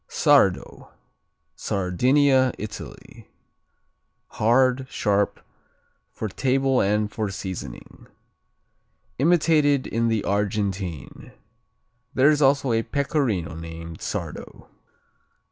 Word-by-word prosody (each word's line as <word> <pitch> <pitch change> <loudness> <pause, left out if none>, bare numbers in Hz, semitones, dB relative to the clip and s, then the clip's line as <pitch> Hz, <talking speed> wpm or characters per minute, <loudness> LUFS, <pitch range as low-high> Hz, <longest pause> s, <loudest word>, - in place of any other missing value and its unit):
Sardo - - +2 0.7
Sardinia, 130 +8 +2
Italy 105 0 -10 1.0
Hard; 130 +3 +2
sharp; 100 -1 0 0.7
for 110 - -5
table 135 +4 +1
and 105 +1 0
for 105 -1 -3
seasoning. 90 -10 -8 1.1
Imitated 150 -3 +3
in 115 +1 -1
the 110 -3 0
Argentine. 100 -5 -3 0.8
There 140 +4 +5
is 150 0 0
also 140 -2 +3
a 115 - +2
Pecorino 130 - -1
named 80 0 -9
Sardo. - - -7
115 Hz, 80 wpm, -23 LUFS, 100-135 Hz, 1.1 s, There